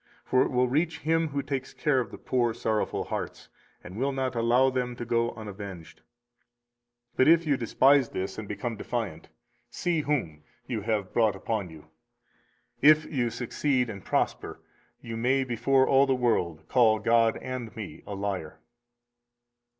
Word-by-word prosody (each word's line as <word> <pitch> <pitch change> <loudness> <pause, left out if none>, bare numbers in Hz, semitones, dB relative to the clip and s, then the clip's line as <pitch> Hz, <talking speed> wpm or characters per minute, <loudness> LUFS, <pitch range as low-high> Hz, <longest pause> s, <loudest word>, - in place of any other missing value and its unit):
For 130 - +3
it - - +2
will 125 0 +2
reach 160 +5 0
Him 165 +1 +1
who 140 -1 -3
takes 135 -1 -4
care 150 -4 +2
of 125 - -3
the - - -10
poor 120 -3 0
sorrowful 110 -1 -1
hearts, - - -6 0.3
and 90 - -10
will 135 +4 0
not 130 -1 -2
allow 120 +3 +3
them 125 -1 -2
to 120 - -6
go 115 0 +1
unavenged. 100 -5 -9 1.1
But 130 - +4
if 165 +1 +5
you 145 -2 +2
despise 130 +2 +3
this 95 +2 -4
and 110 - -7
become 115 +2 -4
defiant, 105 -9 -4 0.4
see 170 -3 -1
whom 115 - -2 0.2
you 115 -4 -3
have 105 -2 -2
brought 110 -3 +3
upon 105 -5 -3
you: 80 -2 -13 1.0
if 155 +2 +6
you 125 -6 -1
succeed 125 +1 -1
and 100 -3 -9
prosper, - - -1 0.4
you 115 - -6
may 130 +4 +2
before 130 +2 +2
all 135 +1 +5
the 135 - +2
world 85 -10 0
call 115 -4 +4
God 115 +1 +3
and 130 -3 -6
me 95 -8 -8
a 100 - -5
liar. 95 -5 -4
120 Hz, 160 wpm, -27 LUFS, 110-135 Hz, 1.1 s, if